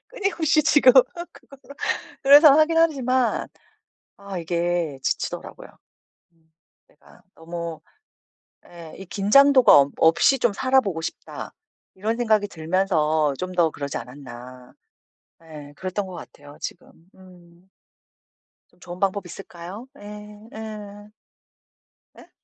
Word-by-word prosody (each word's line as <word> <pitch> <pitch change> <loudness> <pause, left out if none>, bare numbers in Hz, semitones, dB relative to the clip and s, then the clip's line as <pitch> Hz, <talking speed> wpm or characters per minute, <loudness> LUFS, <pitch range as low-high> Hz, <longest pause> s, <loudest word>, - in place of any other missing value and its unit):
끊임없이 345 -9 0
지금 285 -4 +5
그거를 340 +7 +2 0.9
그래서 285 +1 +8
하긴 310 +2 +3
하지만 260 -6 +1 0.7
아 200 -1 -8
이게 170 -3 -2
지치더라고요. - - -4 1.2
내가 - - -23
너무 170 -1 -7 0.9
예 170 -2 -12
이 195 - -10
'긴장도가 260 +8 +5
없 140 0 -1
없이 165 +11 +4
좀 240 -4 +1
살아보고 245 -8 +1
싶다.' - - -7 0.4
이런 215 +4 -2
생각이 220 -4 +1
들면서 160 -4 0
좀 185 0 -5
더 170 -3 +2
그러지 140 -2 -6
않았나. 125 0 -12 0.7
예 150 -3 -12
그랬던 190 +2 -4
것 185 - -10
같아요 145 -3 -13
지금. - - -8 0.2
음. 180 -1 -19 1.0
좀 - - -29
좋은 175 0 -10
방법이 195 -1 -1
있을까요? 185 +6 -10
예, 210 +1 -12
예. 210 -2 -9 1.1
예? - - -17
190 Hz, 230 characters per minute, -23 LUFS, 165-240 Hz, 1.2 s, 그래서